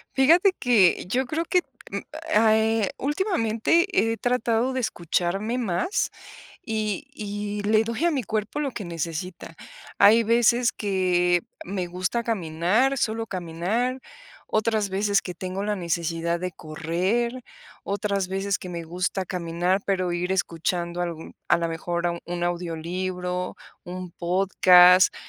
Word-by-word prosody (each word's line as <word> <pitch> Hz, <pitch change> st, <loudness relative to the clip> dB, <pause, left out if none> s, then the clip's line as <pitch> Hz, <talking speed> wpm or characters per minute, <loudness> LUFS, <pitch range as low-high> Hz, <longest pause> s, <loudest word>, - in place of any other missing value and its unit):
Fíjate 340 Hz, +8 st, +5 dB
que, 220 Hz, -11 st, +4 dB
yo 255 Hz, +6 st, 0 dB
creo 315 Hz, +5 st, -2 dB
que, 360 Hz, +1 st, +2 dB, 0.7 s
eh, 220 Hz, -1 st, +3 dB
últimamente 295 Hz, -, +1 dB, 0.3 s
he -, -, -2 dB
tratado 245 Hz, 0 st, +1 dB
de 260 Hz, -, -2 dB
escucharme 195 Hz, +3 st, -1 dB
más 225 Hz, -, -1 dB, 0.5 s
y 215 Hz, +2 st, -2 dB
y 205 Hz, -2 st, -4 dB
le 215 Hz, +1 st, +3 dB
doy 230 Hz, +8 st, -2 dB
a -, -, +4 dB
mi 275 Hz, -5 st, -1 dB
cuerpo 215 Hz, +6 st, -3 dB
lo 285 Hz, -2 st, -1 dB
que 205 Hz, -5 st, -6 dB
necesita. 170 Hz, +1 st, -5 dB, 0.4 s
Hay 220 Hz, +3 st, +7 dB
veces 235 Hz, +2 st, +3 dB
que 180 Hz, -3 st, +1 dB, 0.2 s
me 185 Hz, -1 st, -3 dB
gusta 185 Hz, +7 st, -2 dB
caminar, 210 Hz, +5 st, +1 dB
solo 225 Hz, -2 st, -1 dB
caminar, 195 Hz, +8 st, -2 dB, 0.5 s
otras 215 Hz, -1 st, 0 dB
veces 200 Hz, +1 st, +1 dB
que 180 Hz, -, -7 dB
tengo 185 Hz, +3 st, -4 dB
la 210 Hz, 0 st, 0 dB
necesidad 170 Hz, -1 st, -1 dB
de 185 Hz, 0 st, -3 dB
correr, 185 Hz, +12 st, -2 dB, 0.4 s
otras 200 Hz, -1 st, -1 dB
veces 195 Hz, +1 st, -1 dB
que 180 Hz, -, -8 dB
me 170 Hz, -1 st, -5 dB
gusta 180 Hz, +3 st, -2 dB
caminar, 180 Hz, +1 st, -1 dB
pero 185 Hz, -3 st, 0 dB
ir 180 Hz, +2 st, -1 dB
escuchando 175 Hz, -1 st, -1 dB, 0.5 s
a 175 Hz, -, +4 dB
lo 170 Hz, -1 st, -1 dB
mejor 170 Hz, +1 st, -2 dB
un 175 Hz, 0 st, -3 dB
audiolibro, 180 Hz, +1 st, -3 dB, 0.3 s
un 180 Hz, 0 st, -7 dB
podcast, 180 Hz, 0 st, +5 dB
195 Hz, 130 wpm, -25 LUFS, 175-225 Hz, 0.7 s, Hay